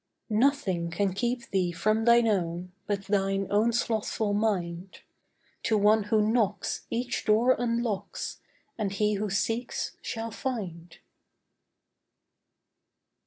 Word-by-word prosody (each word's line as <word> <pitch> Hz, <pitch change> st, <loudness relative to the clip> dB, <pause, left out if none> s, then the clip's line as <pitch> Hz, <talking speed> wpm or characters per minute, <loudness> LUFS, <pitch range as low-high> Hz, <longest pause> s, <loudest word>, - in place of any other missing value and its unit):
Nothing 215 Hz, -8 st, +2 dB
can 190 Hz, +2 st, 0 dB
keep 240 Hz, +4 st, -2 dB
thee 185 Hz, -3 st, +1 dB
from 215 Hz, +6 st, +1 dB
thine 235 Hz, 0 st, +6 dB
own 180 Hz, -3 st, -1 dB, 0.2 s
But 200 Hz, -1 st, -1 dB
thine 195 Hz, -1 st, +1 dB
own 215 Hz, +3 st, +3 dB
slothful 220 Hz, -2 st, 0 dB
mind. 185 Hz, -4 st, -1 dB, 0.6 s
To 220 Hz, -, +3 dB
one 210 Hz, +1 st, +4 dB
who 210 Hz, 0 st, +2 dB
knocks, 215 Hz, -3 st, 0 dB
each 245 Hz, +1 st, -2 dB
door 230 Hz, +4 st, +4 dB
unlocks; 235 Hz, -, -2 dB, 0.4 s
And 205 Hz, -3 st, -1 dB
he 210 Hz, +1 st, +1 dB
who 210 Hz, +1 st, -1 dB
seeks, 225 Hz, +5 st, -2 dB
shall 225 Hz, 0 st, -4 dB
find. 180 Hz, -10 st, -5 dB
210 Hz, 115 wpm, -28 LUFS, 195-230 Hz, 0.6 s, thine